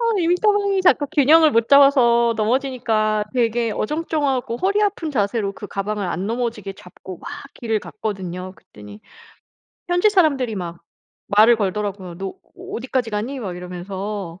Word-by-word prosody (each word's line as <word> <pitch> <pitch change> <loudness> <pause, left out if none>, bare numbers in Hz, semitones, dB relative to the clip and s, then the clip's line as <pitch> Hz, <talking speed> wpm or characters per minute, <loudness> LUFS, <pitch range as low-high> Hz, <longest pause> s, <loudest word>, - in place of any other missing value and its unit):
아 460 -5 +1
이민가방이 395 +3 +2
자꾸 295 -5 +4
균형을 310 +2 +5
못 230 -3 +1
잡아서 240 -5 +5
넘어지니까 220 -3 0
되게 235 -1 +1
어정쩡하고 280 -1 -1
허리 400 +7 +1
아픈 380 -6 -1
자세로 205 -4 -1
그 205 - -9
가방을 200 0 -3
안 185 +3 -3
넘어지게 225 -4 -3
잡고 180 -1 -12
막 - - -9 0.3
길을 225 -3 -2
갔거든요. 185 -4 -6
그랬더니 105 0 -14 0.9
현지 355 +4 +3
사람들이 280 - +2
막 170 -3 -6 0.5
말을 220 +3 +5
걸더라고요. 200 -3 -3
"너 195 - -4 0.3
어 - - -10
어디까지 250 -1 -2
가니?" 225 +7 -3
막 185 -5 -5
이러면서. 185 +1 -6
230 Hz, 345 characters per minute, -21 LUFS, 200-280 Hz, 0.9 s, 균형을